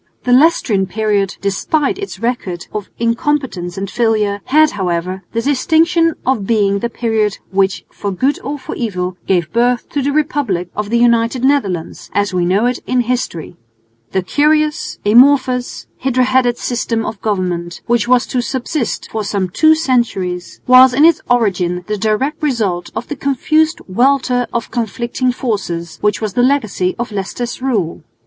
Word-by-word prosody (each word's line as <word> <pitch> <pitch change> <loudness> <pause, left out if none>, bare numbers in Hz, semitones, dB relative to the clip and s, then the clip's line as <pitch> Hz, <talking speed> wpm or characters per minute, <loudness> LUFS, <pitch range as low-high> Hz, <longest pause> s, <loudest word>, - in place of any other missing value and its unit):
The 250 - +2
Leicestrian 250 - +3
period, 205 -2 -1
despite 275 - 0
its 400 - -6
record 200 -6 -3
of 210 -2 -5
incompetence 230 -6 -1
and 195 +1 -3
failure, 210 -2 0
had 310 +2 +4
however 185 -1 -2
the 230 0 -1
distinction 325 +4 +2
of 240 -7 0
being 200 -3 +2
the 235 - -2
period 220 -3 -1
which 195 0 0
for 205 - -4
good 265 +10 0
or 285 +3 -4
for 265 - -7
evil 185 -6 -3
gave 175 -4 0
birth 240 +1 +1
to 285 - -1
the 280 +2 0
republic 270 - -1
of 210 0 -3
the 235 - +2
United 235 +1 +2
Netherlands, 200 - -1
as 205 -1 +1
we 180 -1 +1
know 200 +6 +2
it 250 +1 0
in 255 -1 +2
history. 235 - -3 0.5
The 190 -1 0
curious, 300 +7 +1
amorphous, 255 +2 +3
hydra 255 -1 +1
headed 250 -1 +2
system 235 -2 -2
of 215 -2 -6
government, 180 -5 -2
which 235 -1 +1
was 250 0 +3
to 250 - -1
subsist 255 0 -3
for 220 -1 -2
some 200 -2 -2
two 315 - +4
centuries, 235 - -1
was 255 0 +7
in 290 +4 +5
its 330 -1 +4
origin 185 -7 +1
the 210 - -2
direct 220 +10 -1
result 215 - -1
of 220 +2 -4
the 295 - -4
confused 310 +4 +1
welter 250 +3 +2
of 235 -1 -3
conflicting 235 +2 -1
forces, 190 -9 -4
which 210 0 +1
was 215 -3 -2
the 245 - +2
legacy 225 -9 +1
of 240 -1 -4
Leicester's 215 +5 -4
rule. 215 -11 -1
235 Hz, 160 wpm, -16 LUFS, 195-260 Hz, 0.5 s, was